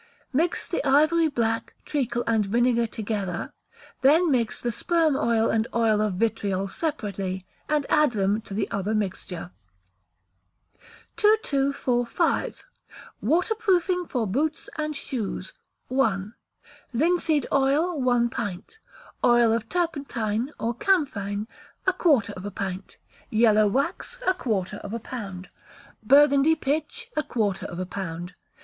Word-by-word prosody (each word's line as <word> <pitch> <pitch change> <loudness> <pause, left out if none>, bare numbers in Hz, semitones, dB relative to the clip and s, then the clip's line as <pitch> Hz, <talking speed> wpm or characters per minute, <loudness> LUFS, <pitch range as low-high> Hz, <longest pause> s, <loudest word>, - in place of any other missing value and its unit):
Mix 330 +6 0
the 345 - -2
ivory 310 +4 +4
black, 230 -5 -1
treacle, 240 -5 -1
and 225 -2 +2
vinegar 235 +3 +2
together, 200 -5 -4 0.5
then 315 +5 +5
mix 235 -5 0
the 240 - -1
sperm 325 +4 +2
oil 230 -3 +2
and 220 +1 +1
oil 220 -2 +3
of 210 -3 0
vitriol 200 -2 0
separately, 195 - -3 0.2
and 300 -2 +1
add 300 -4 +3
them 205 +1 +1
to 200 - -8
the 205 - 0
other 200 +2 -1
mixture. 185 -4 -4 1.7
2245. 280 - +1 0.6
Waterproofing 360 - +1
for 245 -4 -1
Boots 300 - -1
and 305 -1 -2
Shoes 225 -10 -4 0.4
(1). 215 -6 0 0.6
Linseed 315 +2 +2
oil, 285 +4 +2
one 245 -2 +3
pint; 205 - -5 0.4
oil 240 -2 +5
of 225 -1 -2
turpentine, 275 -8 -1
or 230 +1 -1
camphine, 220 - 0 0.4
a 375 - +3
quarter 295 - +2
of 185 - -8
a 205 - -4
pint; 190 -1 -5 0.3
yellow 215 -1 +4
wax, 280 - -2
a 370 - +4
quarter 205 - -2
of 205 +1 -8
a - - -3
pound; 195 -6 -7 0.5
Burgundy 280 +5 +5
pitch, 315 - -2
a 305 - +2
quarter 210 -9 -1
of 175 - -7
a 185 - -2
pound. 175 -2 -5
240 Hz, 125 wpm, -25 LUFS, 205-300 Hz, 1.7 s, then